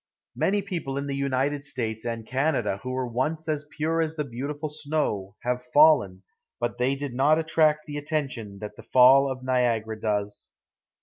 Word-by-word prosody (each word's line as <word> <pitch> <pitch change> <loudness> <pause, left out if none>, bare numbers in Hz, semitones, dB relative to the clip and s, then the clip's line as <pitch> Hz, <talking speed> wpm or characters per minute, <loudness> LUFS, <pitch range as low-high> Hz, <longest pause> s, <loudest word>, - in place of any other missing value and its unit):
Many 200 +1 +1
people 170 -9 -4
in 140 - -2
the 140 -1 -3
United 140 +1 0
States 115 -6 -3
and 115 -1 -3
Canada 130 -6 0
who 130 - -6
were 130 0 -1
once 140 +7 -2
as 150 -1 -2
pure 160 +2 -1
as 160 0 -2
the 150 - -1
beautiful 145 +4 -5
snow, 145 -10 -2
have 125 0 -1
fallen, 140 -12 +5 0.4
but 120 0 -2
they 130 +2 +2
did 140 -2 -5
not 140 +5 +4
attract 155 -1 +2
the 145 -1 -6
attention 135 -9 -3
that 105 0 -7
the - - -11
fall 135 +2 +6
of 130 -1 -6
Niagara 115 -4 0
does. 105 -1 -2
135 Hz, 175 wpm, -26 LUFS, 120-150 Hz, 0.4 s, fall